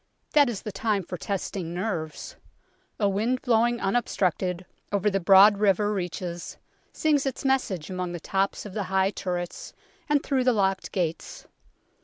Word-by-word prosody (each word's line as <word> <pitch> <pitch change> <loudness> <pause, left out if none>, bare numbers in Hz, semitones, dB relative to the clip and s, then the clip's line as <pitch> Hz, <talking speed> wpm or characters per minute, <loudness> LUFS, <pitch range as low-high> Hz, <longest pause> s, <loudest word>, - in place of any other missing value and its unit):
That 290 -3 +5
is 215 -5 -5
the 210 - -4
time 210 -3 -1
for 180 - -6
testing 180 -1 -4
nerves. 175 -5 -4 0.6
A 205 - +3
wind 220 +6 0
blowing 240 -1 +2
un 195 +3 0
obstructed 185 -5 0 0.3
over 205 +1 +1
the 195 - +1
broad 195 +3 +7
river 205 0 +2
reaches 175 -2 -5 0.3
sings 295 -3 +1
its 270 - -4
message 230 - 0
among 180 -1 -3
the 175 - -5
tops 195 +5 -1
of 205 - -8
the 205 -2 -2
high 190 0 +2
turrets 175 -3 -5 0.4
and 295 -1 +2
through 265 -3 0
the 250 - +4
locked 195 -3 0
gates. 165 -3 -3
195 Hz, 160 wpm, -26 LUFS, 180-225 Hz, 0.6 s, broad